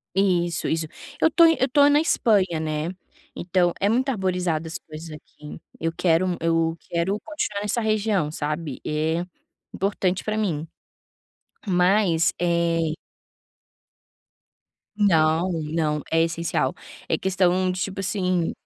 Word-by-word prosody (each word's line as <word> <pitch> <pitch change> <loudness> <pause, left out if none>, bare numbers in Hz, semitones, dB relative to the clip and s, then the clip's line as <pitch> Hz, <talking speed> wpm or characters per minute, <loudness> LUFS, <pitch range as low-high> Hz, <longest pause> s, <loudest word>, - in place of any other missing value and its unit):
Isso, 175 -3 +1
isso. 160 -1 -1 0.3
Eu 320 - +5
estou 335 +1 +6
eu 325 -5 +3
estou 285 +2 +4
na 290 - +5
Espanha, 190 - +2
né. 155 +1 -2 0.4
Então 175 0 +1
é 200 - +2
muito 255 +5 +1
arborizada 180 -7 -1
as 160 - -5
ruas 155 +2 -8
daqui. 150 -1 -11 0.2
Eu 165 0 -1
quero 175 0 +2
eu 165 0 +1
quero 175 +4 -1
continuar 210 -10 -3
nessa 210 +3 -1
região, 215 -7 +1
sabe. 150 -2 -4
É 160 +3 -1 0.5
importante 190 -1 -1
para 215 0 -2
mim, 165 -7 -1 1.0
mas, 180 -2 +3
eh 170 -2 +1 2.0
Não, 170 -3 +3
não. 155 -2 -1
É 165 0 +3
essencial. 165 0 -1 0.3
É - - +1
questão 185 -1 +1
de, 180 - -5
tipo 195 -1 -3
assim, 185 -3 0
175 Hz, 125 wpm, -24 LUFS, 165-195 Hz, 2.0 s, estou